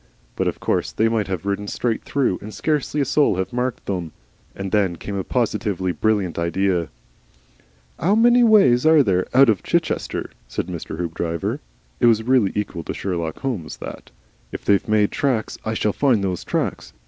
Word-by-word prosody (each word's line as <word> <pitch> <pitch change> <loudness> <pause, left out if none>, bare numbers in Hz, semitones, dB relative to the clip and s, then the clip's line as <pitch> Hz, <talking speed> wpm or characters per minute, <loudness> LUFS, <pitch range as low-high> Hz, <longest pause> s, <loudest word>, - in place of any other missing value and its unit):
But - - 0
of - - -2
course - - -1
they 110 - +2
might 110 -3 0
have 95 -1 -4
ridden 100 +1 -2
straight 115 +2 -1
through 135 -10 0
and 105 - -8
scarcely 150 +2 -1
a - - +1
soul 145 -2 +3
have 95 +2 -3
marked 125 0 -2
them. 90 -5 -3 0.4
And 95 -1 -5
then 100 -4 +2
came 100 +4 -6
a 95 - -2
positively 105 -6 -1
brilliant 100 -4 0
idea. 85 0 0 1.1
"'Ow 190 +8 +2
many 240 +2 +5
ways 195 - +5
are 155 -2 +6
there 95 -5 +1
out 135 +1 +7
of 110 -5 +2
Chichester?" - - -1 0.2
said - - -3
Mr. 85 -3 -6
Hoopdriver. 85 -1 -3 0.4
It - - +4
was 110 -1 +4
really 125 -5 +3
equal 100 -5 -3
to - - -4
Sherlock 85 -4 -3
Holmes 110 -12 -4
that. - - -9 0.4
"If - - -7
they've 100 -1 +2
made 105 -1 +2
tracks, 125 -6 -1
I 110 0 -2
shall 105 -1 0
find 125 -8 +2
those 90 -2 -2
tracks. - - -3
105 Hz, 180 wpm, -22 LUFS, 95-125 Hz, 1.1 s, out